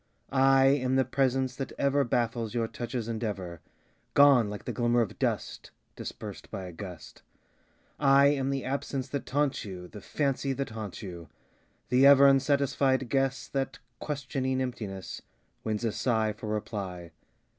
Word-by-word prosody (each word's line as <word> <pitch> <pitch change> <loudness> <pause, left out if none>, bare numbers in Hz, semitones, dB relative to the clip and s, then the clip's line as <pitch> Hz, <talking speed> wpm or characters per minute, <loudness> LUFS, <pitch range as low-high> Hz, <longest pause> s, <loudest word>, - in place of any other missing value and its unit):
I 135 0 +5
am 130 -1 +3
the 130 -1 +3
presence 130 0 0
that 135 - -4
ever 140 0 +2
Baffles 120 -2 -1
your 115 -1 +1
touch's 120 0 -4
endeavor, 100 -7 -4 0.5
Gone 140 -6 +6
like 105 0 -7
the - - -2
glimmer 120 0 +2
of 110 - -3
dust - - -2 0.3
Dispersed - - -8
by 95 - -5
a 90 - -7
gust. 85 -3 -10 0.8
I 140 -1 +6
am 135 -2 0
the 135 -1 -2
absence 135 0 -3
that 140 0 -4
taunts 145 0 0
you, 90 -3 -7
The 105 +3 -11
fancy 135 +4 -1
that 135 -2 -4
haunts 110 -2 -6
you; 85 -5 -8 0.6
The 130 +3 +6
ever 140 0 +8
unsatisfied 135 -1 +3
guess 135 0 0
That, 135 -1 -2 0.2
questioning 130 -2 -2
emptiness, 105 -7 -5 0.4
Wins 110 +1 -2
a 115 - +1
sigh 110 -2 0
for 105 +1 -8
reply. 100 -5 -4
125 Hz, 150 wpm, -29 LUFS, 105-135 Hz, 0.8 s, ever